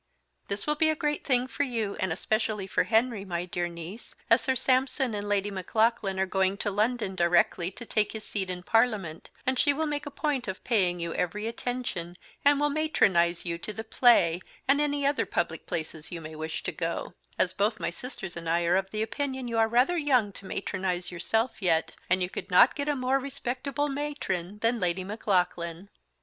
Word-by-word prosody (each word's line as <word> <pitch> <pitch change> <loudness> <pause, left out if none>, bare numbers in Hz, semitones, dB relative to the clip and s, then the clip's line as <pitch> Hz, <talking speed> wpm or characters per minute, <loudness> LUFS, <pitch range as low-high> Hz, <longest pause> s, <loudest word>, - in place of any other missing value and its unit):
This 200 0 -3
will 300 - +2
be 315 +1 +3
a 315 - +2
great 295 -1 -1
Thing 250 -3 +2
for 260 - -4
you, 230 -7 -1
and 190 -2 0
especially 215 +2 -1
for 190 - +1
Henry, 225 -2 +2
my 175 -2 -3
dear 175 -1 -2
niece, 170 +6 -9 0.2
as 230 +1 +6
Sir 260 +3 0
Sampson 260 0 +1
and 205 0 -3
Lady 205 0 +1
Maclaughlan 195 +1 +1
are 190 - +3
going 190 +1 +1
to 205 - -2
London 215 0 0
directly 175 0 +3
to 235 +5 -10
take 215 -2 +1
his 220 -1 -6
Seat 195 -3 -3
in 180 -1 -4
Parliament; 210 -8 +1 0.2
and 260 -1 +1
she 285 - +4
will 315 +3 -1
make 295 -1 -3
a - - -2
point 285 -4 -2
of 190 0 -5
Paying 185 -7 +2
you 170 -1 -3
every 205 +5 -2
attention, 230 -7 -4 0.3
and 285 0 +5
will 295 0 +2
Matronise 185 - +2
you 170 -1 -2
to 215 - -5
the 220 +1 -6
play, 220 -7 +4 0.3
and 280 +2 +4
any 290 -1 0
other 285 +1 +1
Public - - -2
places 160 -1 -5
you 175 - -4
may 160 -1 -8
wish 160 +1 -4
to - - -2
go; 170 0 -3 0.2
as 185 - +2
both 210 +3 +1
my - - -1
Sisters 195 -3 -7
and 165 -1 -4
I 170 +1 +2
are 175 +2 +4
of 190 0 -2
opinion 260 +4 -2
you 230 -1 0
are 225 - +5
rather 250 +10 +3
Young 255 -9 +2
to 195 0 -11
matronise 185 -3 -2
yourself 220 +7 -1
yet, 165 -3 +2 0.2
and 185 +1 +3
you - - 0
could - - -6
not 190 +7 +7
get 285 +1 -2
a 295 - +2
more 260 +1 +1
Respectable 275 +1 -3
Matron 270 - -3
than 230 +1 +2
Lady 180 0 0
Maclaughlan. 180 -3 -1
210 Hz, 205 wpm, -28 LUFS, 180-255 Hz, 0.3 s, not